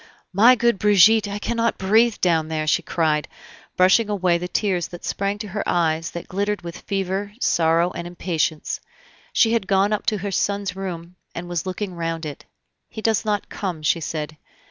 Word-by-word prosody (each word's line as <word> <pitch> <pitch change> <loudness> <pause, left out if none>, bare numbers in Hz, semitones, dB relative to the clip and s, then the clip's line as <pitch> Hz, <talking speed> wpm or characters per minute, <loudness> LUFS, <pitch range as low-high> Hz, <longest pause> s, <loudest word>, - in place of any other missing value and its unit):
"My 230 +7 +7
good 235 -4 +1
Brigitte, 210 +1 +5
I 200 0 -4
cannot 230 +2 -1
breathe 220 +4 +3
down 165 -3 +2
there!" 155 -1 -2
she 155 - +2
cried, 155 -3 0 0.5
brushing 195 +4 +4
away 185 -4 +1
the 180 - -4
tears 180 -3 0
that 175 - -10
sprang 200 +1 -1
to 210 0 -7
her 210 +3 -3
eyes 165 -1 +1
that 170 - -7
glittered 200 0 -2
with 170 0 -7
fever, 195 +1 -3
sorrow, 165 -3 +2
and 170 0 -6
impatience. 170 -3 -2 0.5
She 225 0 +3
had 225 -5 0
gone 195 +2 +2
up 210 - -3
to 215 - +2
her 200 +1 -4
son's 200 0 -1
room, 180 -2 -6 0.2
and 175 +1 -5
was 175 0 -3
looking 185 +1 -4
round 165 -1 -3
it. 145 -2 -7 0.4
"He 220 - -8
does 225 -1 +1
not 210 -1 -1
come," 175 -6 -4
she 165 - +2
said. 155 0 -4
185 Hz, 185 wpm, -22 LUFS, 170-205 Hz, 0.5 s, My